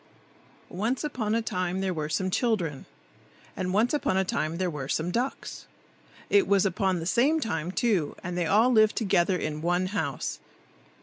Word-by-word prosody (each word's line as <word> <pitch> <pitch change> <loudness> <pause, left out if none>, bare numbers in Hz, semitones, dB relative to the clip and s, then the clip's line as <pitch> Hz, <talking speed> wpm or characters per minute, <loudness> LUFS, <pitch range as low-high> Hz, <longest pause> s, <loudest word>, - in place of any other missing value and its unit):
ONCE 225 - -2
upon 225 -7 -1
a 230 - 0
time 185 -3 -2
there 190 -1 -1
were 155 -2 -3
some 185 +3 -1
children, 180 - -1 0.7
and 185 -1 -2
once 220 +7 +2
upon 285 -10 +1
a 190 - +2
time 160 -2 -2
there 185 0 0
were 145 -5 -4
some 160 +5 -1
ducks. 250 +7 -3 0.6
It 400 -2 +3
was 200 -1 +3
upon 190 0 +1
the 165 - -5
same 270 - +3
time, 170 - -2
too, 195 -7 0
and 180 0 -4
they 175 -2 0
all 220 +8 +4
lived 215 -2 +4
together 185 -4 +2
in 155 -2 -4
one 175 +2 +1
house. - - -2
190 Hz, 175 wpm, -27 LUFS, 175-225 Hz, 0.7 s, all